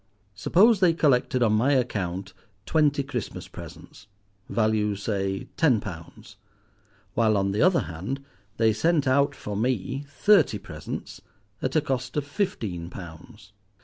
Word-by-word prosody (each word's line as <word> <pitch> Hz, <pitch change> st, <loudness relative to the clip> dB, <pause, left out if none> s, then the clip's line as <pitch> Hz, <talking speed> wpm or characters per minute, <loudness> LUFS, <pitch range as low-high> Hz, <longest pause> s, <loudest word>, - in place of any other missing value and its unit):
Suppose 195 Hz, -, +4 dB
they 180 Hz, -3 st, +4 dB
collected 130 Hz, -5 st, +2 dB
on 110 Hz, -2 st, +3 dB
my 125 Hz, +7 st, +3 dB
account 95 Hz, -7 st, -1 dB, 0.3 s
twenty 145 Hz, -3 st, +2 dB
Christmas 125 Hz, -5 st, -5 dB
presents, 95 Hz, -, -12 dB, 0.4 s
value, 110 Hz, -2 st, +1 dB
say, 95 Hz, -1 st, -2 dB
ten 135 Hz, -9 st, +4 dB
pounds, 85 Hz, -6 st, -10 dB, 0.8 s
while 110 Hz, -2 st, +3 dB
on 100 Hz, 0 st, +1 dB
the 100 Hz, -, 0 dB
other 180 Hz, 0 st, +4 dB
hand 100 Hz, +12 st, -5 dB, 0.3 s
they 110 Hz, -1 st, +3 dB
sent 160 Hz, +5 st, +2 dB
out 140 Hz, +2 st, +3 dB
for 105 Hz, -5 st, -6 dB
me 125 Hz, +4 st, -1 dB
thirty 155 Hz, -, +4 dB
presents -, -, -8 dB, 0.4 s
at 130 Hz, +3 st, -2 dB
a 155 Hz, -, +4 dB
cost 130 Hz, -2 st, -3 dB
of 145 Hz, -, 0 dB
fifteen 110 Hz, -, -3 dB
pounds. 100 Hz, +4 st, -11 dB
120 Hz, 135 wpm, -26 LUFS, 100-145 Hz, 0.8 s, Suppose